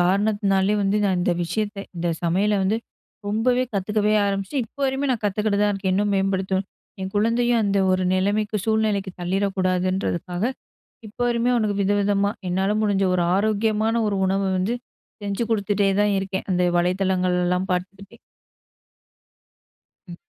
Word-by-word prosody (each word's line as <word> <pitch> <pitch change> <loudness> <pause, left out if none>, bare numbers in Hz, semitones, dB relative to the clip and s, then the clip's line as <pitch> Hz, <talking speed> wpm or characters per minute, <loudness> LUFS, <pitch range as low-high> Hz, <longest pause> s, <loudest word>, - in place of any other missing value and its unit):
காரணத்துனாலயே 200 +1 +2
வந்து 200 +1 +1
நான் 190 -3 +1
இந்த 175 - +1
விஷயத்த 205 +5 -2 0.2
இந்த 170 0 -1
சமையல 195 +5 +1
வந்து 200 +4 +1 0.5
ரொம்பவே 245 +5 +1
கத்துக்கவே 210 +2 +1
ஆரம்ச்சு 195 +3 -3
இப்ப 225 - -22
வரையுமே 270 +1 0
நான் 230 - -4
கத்துக்கிட்டு 205 +1 0
தான் 205 - +2
இருக்கேன். 195 -1 -1
இன்னும் 205 +1 +1
மேம்படுத்தணும். 190 0 0 0.3
என் 190 0 -4
குழந்தையும் 235 +2 +2
அந்த 200 -1 +1
ஒரு 185 0 +1
நிலைமைக்கு 205 +3 0
சூழ்நிலைக்கு 215 -3 +1
தள்ளிடக்கூடாதுன்றதுக்காக. 185 -1 -1 0.6
இப்ப 210 - -15
வரையுமே 240 +1 +1
அவனுக்கு 215 -4 0
வித 195 +1 +1
விதமா, 200 0 +1 0.2
என்னால 190 +3 0
முடிஞ்ச 200 -2 +1
ஒரு 180 - +2
ஆரோக்கியமான 215 +2 +1
ஒரு 200 -2 -1
உணவு 195 +1 0
வந்து 200 +6 0 0.5
செஞ்சு 200 +2 -2
குடுத்துட்டே 205 -2 +1
தான் 210 -1 +2
இருக்கேன், 190 0 -4
அந்த 180 -1 +2 0.2
வலைத்தளங்கள்லாம் 180 0 +1
பாத்துக்குட்டு. 190 +2 -5 1.9
ம். 175 - -8
200 Hz, 135 wpm, -23 LUFS, 190-210 Hz, 1.9 s, காரணத்துனாலயே